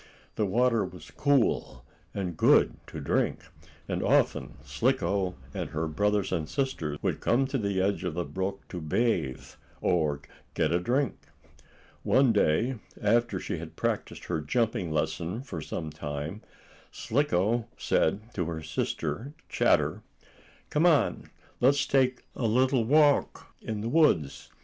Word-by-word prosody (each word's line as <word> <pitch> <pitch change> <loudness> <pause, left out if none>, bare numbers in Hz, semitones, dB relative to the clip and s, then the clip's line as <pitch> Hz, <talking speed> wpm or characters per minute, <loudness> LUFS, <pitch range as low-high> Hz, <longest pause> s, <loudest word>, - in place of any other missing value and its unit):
The 105 - 0
water 115 +2 +2
was 90 -3 -9
cool, 145 -4 +1 0.3
and 90 -4 -3
good - - +5
to - - -7
drink, - - 0 0.5
and - - -2
often - - +1
Slicko, 95 0 0 0.2
and - - -4
her 80 +1 -2
brothers 105 +5 0
and 80 -4 -2
sister, 85 - -2
would - - 0
come 130 +3 +2
to 135 0 -2
the 100 -3 -1
edge 100 +2 0
of 90 -3 -3
the 90 -1 -1
brook 95 +1 -4
to 90 - -5
bathe, 80 - 0 0.3
or 75 -5 +1 0.3
get 75 - +1
a 85 - +2
drink. 130 +9 0 0.8
One 130 -3 +4
day, 110 +6 +2 0.2
after 120 +3 +2
she - - -4
had - - -9
practiced - - -2
her 85 -3 -2
jumping 110 - 0
lesson 80 - -2
for 85 - -6
some 80 +1 -5
time, 75 +5 -5 0.5
Slicko 120 -3 0
said 105 +8 0
to 90 - -1
her 80 -1 -4
sister, 110 - -3 0.2
Chatter: - - +2 0.7
"Come 155 +4 +4
on, 150 -8 +2 0.3
let's 140 +3 +4
take 130 -2 +2
a 115 - 0
little 130 +1 +3
walk 145 +2 +3
in 110 -2 -4
the 110 - -3
woods. 120 - +2
105 Hz, 140 wpm, -28 LUFS, 85-125 Hz, 0.8 s, good